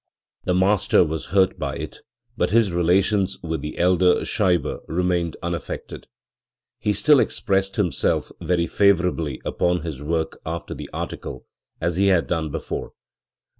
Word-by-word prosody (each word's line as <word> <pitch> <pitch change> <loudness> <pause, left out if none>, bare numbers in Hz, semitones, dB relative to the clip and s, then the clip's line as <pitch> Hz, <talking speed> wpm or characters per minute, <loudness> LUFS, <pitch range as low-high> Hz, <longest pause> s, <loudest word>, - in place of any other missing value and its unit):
The 90 - +1
master 95 0 +4
was 80 -1 -4
hurt 95 -1 +2
by - - -3
it, - - -6 0.4
but - - +1
his 110 -1 +3
relations 95 +3 +2
with 80 -1 -3
the 75 - -6
elder 90 0 +3
Scheibe 90 - +1
remained 90 -1 0
unaffected; 85 -2 -5 0.7
he 105 - +1
still 145 +8 +5
expressed 95 -4 0
himself 95 -6 0
very 85 -1 +1
favourably 90 -8 +2
upon 90 -1 0
his 75 -5 -5
work 80 +2 -2
after 85 +1 -5
the - - -8
article, - - -6 0.3
as 85 +1 -1
he 100 +1 +3
had 90 -4 +3
done 80 -2 -1
before. - - -5
90 Hz, 140 wpm, -23 LUFS, 85-95 Hz, 0.7 s, still